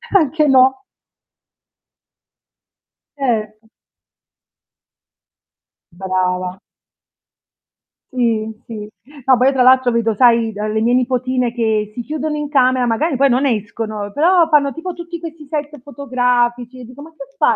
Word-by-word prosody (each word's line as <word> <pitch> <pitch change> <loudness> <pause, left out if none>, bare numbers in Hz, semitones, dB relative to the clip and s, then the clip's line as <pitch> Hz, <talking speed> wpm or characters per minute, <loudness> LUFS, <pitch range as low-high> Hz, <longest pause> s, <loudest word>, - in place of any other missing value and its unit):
anche 310 -3 +3
no. 265 0 +4 2.3
Certo. 220 -4 -3 2.2
Brava. 185 0 -2 1.5
Sì, 230 -3 0 0.2
sì. 210 -2 -8 0.4
No, 260 -2 +5
poi 255 +2 +3
io 275 - +3
tra 260 - +1
l'altro 255 0 +5
vedo 230 -1 +1
sai, 230 -1 +3
d 205 - -12
le 215 +1 -1
mie 240 +2 +2
nipotine 255 -1 0
che 220 -3 -1
si 240 - -4
chiudono 305 +3 -4
in 295 -1 -4
camera, 255 -3 +2
magari 270 +6 0
poi 275 +1 +3
non 255 +3 +1
escono, 215 -3 -3
però 335 +1 +3
fanno 285 -3 +3
tipo 345 +3 -6
tutti 340 0 -8
questi 320 -2 -9
set 295 -1 -5
fotografici 250 -3 -1
e - - -10
dico: 250 +4 -12
"Ma 325 - -13
che 320 - -11
fai?" - - +3
250 Hz, 130 wpm, -17 LUFS, 225-285 Hz, 2.3 s, No